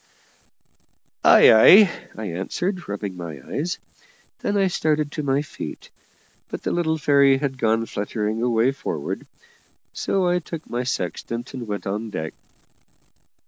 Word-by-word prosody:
"Ay, -, -, +8 dB
ay," 185 Hz, -, +8 dB, 0.3 s
I 110 Hz, -, -5 dB
answered, 175 Hz, -, -3 dB
rubbing 100 Hz, -2 st, -4 dB
my 85 Hz, -5 st, -7 dB
eyes. 170 Hz, +5 st, -2 dB, 0.6 s
Then 205 Hz, -, -1 dB
I 195 Hz, -, +3 dB
started 155 Hz, -4 st, 0 dB
to 150 Hz, -, -4 dB
my 140 Hz, 0 st, 0 dB
feet, -, -, -8 dB, 0.6 s
but -, -, -6 dB
the -, -, -1 dB
little 160 Hz, -2 st, 0 dB
fairy 140 Hz, -2 st, +4 dB
had 135 Hz, -1 st, -3 dB
gone 115 Hz, 0 st, +1 dB
fluttering 105 Hz, +1 st, -3 dB
away 120 Hz, +1 st, +2 dB
forward, 80 Hz, -, -5 dB, 0.7 s
so 190 Hz, -2 st, 0 dB
I 175 Hz, 0 st, +2 dB
took 165 Hz, -1 st, -8 dB
my 120 Hz, -, -2 dB
sextant 115 Hz, +2 st, -4 dB
and 125 Hz, -3 st, -6 dB
went 105 Hz, -1 st, -4 dB
on 105 Hz, +3 st, -3 dB
deck. 80 Hz, -6 st, -5 dB
130 Hz, 140 wpm, -23 LUFS, 105-155 Hz, 0.7 s, Ay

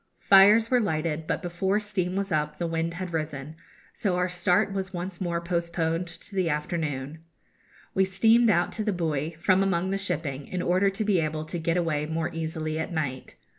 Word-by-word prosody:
Fires 205 Hz, +4 st, +6 dB
were 250 Hz, -, +5 dB
lighted, 160 Hz, -5 st, -1 dB
but -, -, -2 dB
before 190 Hz, +4 st, 0 dB
steam 190 Hz, -4 st, -2 dB
was 195 Hz, 0 st, -2 dB
up 150 Hz, -1 st, 0 dB
the 175 Hz, -, -2 dB
wind 165 Hz, 0 st, -2 dB
had 180 Hz, -1 st, -5 dB
risen; 155 Hz, -1 st, -4 dB, 0.4 s
so 200 Hz, -6 st, -1 dB
our 180 Hz, +1 st, +1 dB
start 180 Hz, +2 st, +1 dB
was 190 Hz, -1 st, -3 dB
once 175 Hz, +1 st, -5 dB
more 170 Hz, -2 st, -1 dB
postponed 170 Hz, 0 st, -1 dB
to 170 Hz, +4 st, -10 dB
the 185 Hz, -3 st, +1 dB
afternoon. 150 Hz, -2 st, -3 dB, 0.7 s
We 190 Hz, -, +3 dB
steamed 225 Hz, +5 st, +4 dB
out 175 Hz, -4 st, +2 dB
to 215 Hz, -, -3 dB
the 210 Hz, -1 st, 0 dB
buoy, 160 Hz, -4 st, -1 dB
from 185 Hz, +4 st, +2 dB
among 190 Hz, -1 st, +1 dB
the 195 Hz, -, -1 dB
shipping, 155 Hz, -8 st, -3 dB
in 180 Hz, -1 st, -3 dB
order 185 Hz, +3 st, +3 dB
to 195 Hz, +3 st, -3 dB
be 200 Hz, -4 st, +3 dB
able 155 Hz, -1 st, -2 dB
to 170 Hz, +2 st, -4 dB
get 165 Hz, +2 st, 0 dB
away 155 Hz, -4 st, 0 dB
more 160 Hz, +2 st, -2 dB
easily 160 Hz, -1 st, -3 dB
at 160 Hz, -, -3 dB
night. 145 Hz, -6 st, -3 dB
175 Hz, 195 wpm, -27 LUFS, 160-190 Hz, 0.7 s, Fires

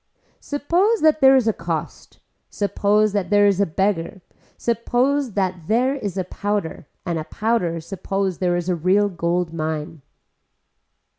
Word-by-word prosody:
Suppose 350 Hz, +10 st, 0 dB
that 310 Hz, 0 st, +3 dB
there 265 Hz, 0 st, +7 dB
is 255 Hz, -4 st, +2 dB
a 220 Hz, -, +3 dB
cost, 165 Hz, -3 st, -5 dB, 0.3 s
suppose 210 Hz, +1 st, +1 dB
that 200 Hz, -3 st, -1 dB
there 205 Hz, 0 st, +4 dB
is 200 Hz, -1 st, +3 dB
a 200 Hz, -, +2 dB
beggar, 185 Hz, +1 st, -1 dB, 0.3 s
suppose 245 Hz, +3 st, 0 dB
that 185 Hz, -4 st, -2 dB
there 250 Hz, +5 st, +2 dB
is 205 Hz, -9 st, -5 dB
a 185 Hz, -, 0 dB
powder 200 Hz, -5 st, -3 dB, 0.2 s
and 170 Hz, -2 st, -2 dB
a -, -, -4 dB
powder 180 Hz, -3 st, -1 dB
suppose 190 Hz, +1 st, -3 dB
there 180 Hz, -1 st, +1 dB
is 175 Hz, 0 st, -4 dB
a 180 Hz, -, +1 dB
real 190 Hz, +5 st, +2 dB
gold 170 Hz, -1 st, -1 dB
mine. 155 Hz, -1 st, -4 dB
195 Hz, 150 wpm, -21 LUFS, 175-230 Hz, 0.3 s, there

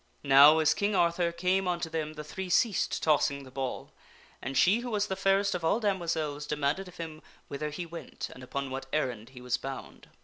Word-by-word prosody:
Now 145 Hz, +3 st, +8 dB
as 155 Hz, -1 st, +4 dB
King 205 Hz, +5 st, 0 dB
Arthur 170 Hz, -1 st, +2 dB
came 185 Hz, +2 st, 0 dB
unto 175 Hz, -2 st, -1 dB
them 160 Hz, -1 st, -3 dB
the 150 Hz, 0 st, -7 dB
three 185 Hz, +5 st, -6 dB
ceased 200 Hz, +2 st, +1 dB
tossing 145 Hz, -2 st, +2 dB
the 130 Hz, -, -13 dB
ball, 130 Hz, -1 st, -4 dB, 0.5 s
and 135 Hz, -, -3 dB
she 200 Hz, +6 st, +5 dB
who 245 Hz, 0 st, -5 dB
was 210 Hz, -2 st, 0 dB
the 190 Hz, -, -3 dB
fairest 195 Hz, +1 st, +2 dB
of 175 Hz, -, -3 dB
all 180 Hz, +7 st, +2 dB
damoiselles 160 Hz, -8 st, -1 dB
demanded 150 Hz, +6 st, -1 dB
of 180 Hz, -, -13 dB
him 160 Hz, -2 st, -7 dB, 0.3 s
whither 150 Hz, +2 st, -3 dB
he 160 Hz, +4 st, -5 dB
went 170 Hz, 0 st, -7 dB
and 125 Hz, -, -13 dB
upon 135 Hz, +1 st, -4 dB
what 135 Hz, 0 st, -5 dB
errand 125 Hz, -6 st, -2 dB
he 130 Hz, -1 st, -12 dB
was 125 Hz, 0 st, -1 dB
bound. 135 Hz, 0 st, -8 dB
160 Hz, 205 wpm, -29 LUFS, 140-185 Hz, 0.5 s, Now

